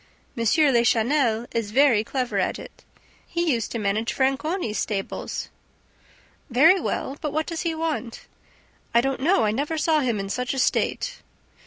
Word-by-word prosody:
M. 230 - -2
Lachenel 240 -2 +3
is 230 -3 -2
very 245 -2 +4
clever 255 +1 -2
at - - 0
it. - - -12 0.4
He 340 -3 0
used 230 -2 -2
to - - -3
manage 215 +2 -1
Franconi's 270 - -1
stables." 195 -2 -4 1.0
"Very 315 +10 +5
well... 280 -4 -3
but 300 - -2
what 310 +2 -1
does 330 -2 -4
he 330 -2 -1
want?" 315 -7 -3 0.7
"I 235 - +6
don't 270 +1 -2
know; 315 -3 +3
I 210 - +2
never 290 +8 -2
saw 310 0 +2
him 240 -7 0
in 195 - -4
such 250 +5 -2
a - - -5
state." - - 0
265 Hz, 160 wpm, -24 LUFS, 230-310 Hz, 1.0 s, I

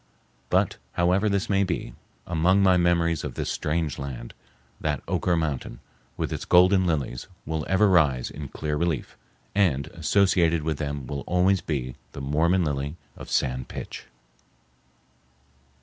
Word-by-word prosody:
But, - - +2 0.2
however 90 +5 +2
this 100 -1 0
may 100 -1 +2
be, 70 -9 -3 0.3
among 90 +4 +3
my 95 -1 +5
memories 85 -2 +2
of 70 -5 -5
this - - -2
strange 80 -2 -1
land, 65 -3 -6 0.5
that - - -2
Oquirrh 90 -2 +1
mountain, 75 -6 -3 0.4
with - - -2
its - - -4
golden 90 +1 +5
lilies, 70 -6 -2 0.2
will 80 0 -2
ever 95 +3 +4
rise 75 -10 +3
in 75 -1 -7
clear 75 +2 -3
relief, 80 -5 -2 0.4
and 85 -9 +2
associated 85 -2 +2
with 80 -2 -2
them 70 -3 -3
will 70 +2 -4
always 90 +1 +3
be 65 -5 -3 0.2
the - - -7
Mormon 80 +6 +2
lily 70 0 -2 0.2
of - - -10
San 65 -1 0
Pitch. - - -8
80 Hz, 145 wpm, -26 LUFS, 70-90 Hz, 0.5 s, my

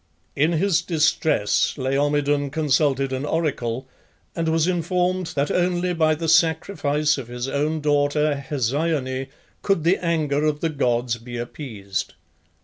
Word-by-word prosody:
In 155 +5 +2
his 175 0 +2
distress 160 - +1
Laomedon 145 +1 +1
consulted 140 -2 +1
an 130 +1 -2
oracle, 135 -6 -2 0.5
and 165 -1 -1
was 165 +1 +2
informed 180 +1 0
that 140 0 0
only 180 0 +1
by 160 -2 +2
the 165 +1 -4
sacrifice 160 -3 +2
of 125 - -7
his 120 +1 -5
own 150 +3 -1
daughter 145 0 +1
Hesione 135 0 -1 0.3
could 195 -6 +1
the 180 +3 +2
anger 155 -4 0
of 150 -1 +1
the 165 - 0
gods 120 -5 0
be 120 +1 -8
appeased. 110 - -5
150 Hz, 135 wpm, -23 LUFS, 135-165 Hz, 0.5 s, In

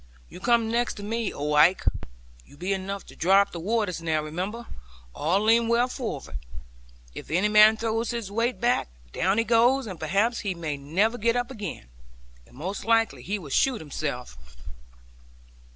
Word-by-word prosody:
'You - - -11
come 230 +1 +2
next 240 +1 0
to 205 - -8
me, 225 +1 -2
old 150 +1 -2
Ike; 175 +5 +5 0.6
you 140 - -19
be 185 +5 -1
enough 195 0 -4
to - - -14
dry 190 +4 +4
up 200 - -2
the 170 - -6
waters; 200 -2 -1
now, 160 -2 0
remember, 185 +10 -5 0.5
all 175 +7 +1
lean 230 +2 +4
well 235 +2 +3
forward. 145 - -5 0.7
If - - -9
any 185 +7 +2
man 215 +1 +7
throws 225 +1 -1
his 235 -5 -4
weight 230 +4 -1
back, 240 0 +1 0.2
down 190 +3 0
he 230 - +3
goes; 240 +4 +3
and 185 -6 -7
perhaps 200 +9 +1
he 195 -4 -3
may 160 -4 -4
never 185 +12 0
get 230 +2 +2
up 245 +1 -1
again; 205 - -7 0.6
and - - -20
most 185 +7 -5
likely 225 0 +2
he 205 +2 -3
will 155 -8 -10
shoot 255 - +2
himself.' 140 - -5
205 Hz, 175 wpm, -26 LUFS, 170-230 Hz, 0.7 s, man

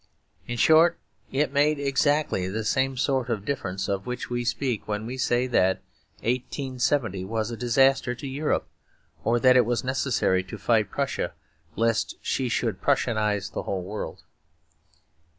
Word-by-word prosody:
In 120 - -3
short, 165 +6 +5 0.3
it 140 +1 0
made 150 +1 +3
exactly 140 -7 +1
the 110 +4 -3
same 130 +4 +1
sort 130 -1 0
of 105 -4 -2
difference 95 -9 -2
of 100 +1 -2
which 125 0 -4
we 120 0 -1
speak 125 -1 -2
when 105 0 -2
we 125 +3 -4
say 125 -1 +1
that 95 -7 +2 0.4
1870 125 -3 -1
was 110 +2 -2
a - - -3
disaster 125 +2 +3
to 135 - -9
Europe, 145 +3 -1 0.6
or 120 +1 +2
that 130 +1 +6
it 125 - +7
was 120 +1 -1
necessary 130 -7 +1
to 95 - -8
fight 110 -4 +2
Prussia 140 +4 -2 0.4
lest 115 -1 +1
she 130 -2 -1
should - - -1
Prussianise 105 -3 +1
the - - -3
whole 95 -2 -3
world. 105 +4 -6
120 Hz, 150 wpm, -26 LUFS, 110-135 Hz, 0.6 s, it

